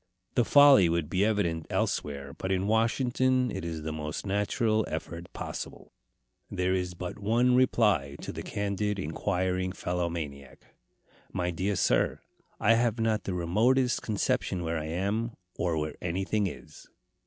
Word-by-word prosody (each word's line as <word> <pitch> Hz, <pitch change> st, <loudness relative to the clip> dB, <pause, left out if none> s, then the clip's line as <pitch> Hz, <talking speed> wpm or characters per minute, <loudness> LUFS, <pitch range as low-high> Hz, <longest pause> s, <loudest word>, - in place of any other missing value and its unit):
The 120 Hz, -, +3 dB
folly 140 Hz, -, +7 dB
would 85 Hz, -2 st, -1 dB
be 95 Hz, +2 st, +2 dB
evident 95 Hz, -7 st, 0 dB
elsewhere, 70 Hz, -1 st, -2 dB
but 95 Hz, -, -4 dB
in 95 Hz, 0 st, +1 dB
Washington 125 Hz, +3 st, +2 dB
it 95 Hz, -, -4 dB
is 80 Hz, -2 st, -4 dB
the 80 Hz, 0 st, -3 dB
most 75 Hz, +2 st, -5 dB
natural 110 Hz, +2 st, +1 dB
effort 85 Hz, +1 st, -6 dB
possible. -, -, -7 dB, 0.6 s
There 90 Hz, +1 st, 0 dB
is 90 Hz, -1 st, -2 dB
but 90 Hz, +3 st, -6 dB
one 120 Hz, +5 st, +3 dB
reply 105 Hz, -, +3 dB
to -, -, -5 dB
the -, -, -6 dB
candid 105 Hz, 0 st, -2 dB
and 90 Hz, -6 st, -3 dB
inquiring 90 Hz, +1 st, -1 dB
fellow 90 Hz, -2 st, -2 dB
maniac: 70 Hz, -5 st, -7 dB, 0.6 s
"My 90 Hz, -1 st, -1 dB
dear 95 Hz, +4 st, -1 dB
sir, -, -, +2 dB, 0.4 s
I 115 Hz, -, +5 dB
have 115 Hz, 0 st, +1 dB
not 110 Hz, -2 st, 0 dB
the 95 Hz, -, -2 dB
remotest 120 Hz, +9 st, +2 dB
conception 95 Hz, -4 st, -1 dB
where 80 Hz, 0 st, -1 dB
I 75 Hz, -, -5 dB
am, 100 Hz, +8 st, -1 dB, 0.2 s
or 85 Hz, -2 st, 0 dB
where 75 Hz, 0 st, -2 dB
anything 95 Hz, +4 st, 0 dB
is." -, -, -10 dB
95 Hz, 155 wpm, -29 LUFS, 85-110 Hz, 0.6 s, folly